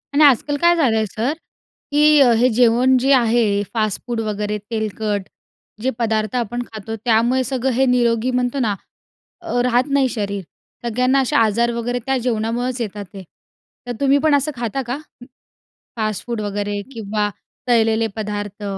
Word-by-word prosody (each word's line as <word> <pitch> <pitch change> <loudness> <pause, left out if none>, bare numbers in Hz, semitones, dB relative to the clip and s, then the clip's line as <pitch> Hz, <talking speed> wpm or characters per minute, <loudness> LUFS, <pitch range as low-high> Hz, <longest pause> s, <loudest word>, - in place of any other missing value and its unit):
आणि 300 - +5
आजकाल 285 +1 +4
काय 345 0 +5
झालं 270 -9 +2
आहे 220 - +1
सर, 225 +5 -2 0.6
की 300 0 +5 0.2
हे 250 +2 +4
जेवण 245 +2 +4
जे 270 +3 +1
आहे 225 -5 +2
फास्टफूड 225 +2 -2
वगैरे 210 -1 -2
तेलकट 215 -2 -2 0.5
जे 255 - +1
पदार्थ 220 -1 0
आपण 240 0 -2
खातो 220 +1 -6
त्यामुळे 240 +3 +3
सगळं 260 +1 -1
हे 265 +2 +2
निरोगी 240 -1 +2
म्हणतो 250 +2 0
ना. 215 -5 0 0.7
अ, 285 -8 -1
राहत 250 +2 +2
नाही 270 -2 +3
शरीर. 200 -3 -3 0.4
सगळ्यांना 250 +4 +2
असे 255 - -1
आजार 230 +2 +3
वगैरे 245 +1 -2
त्या 270 0 +1
जेवणामुळंच 240 +1 -2
येतात 205 -2 -5
ते. 195 -1 -8 0.6
तर - - -3
तुम्ही 275 0 +4
पण 305 -2 +4
असं 285 +2 0
खाता 240 +2 -3
का, 250 +3 -2 1.0
फास्टफूड 215 +1 -2
वगैरे 205 0 -3
किंवा 210 -1 -1 0.4
तळलेले 225 -2 +3
पदार्थ? 205 -1 -5
235 Hz, 150 wpm, -20 LUFS, 215-255 Hz, 1.0 s, आणि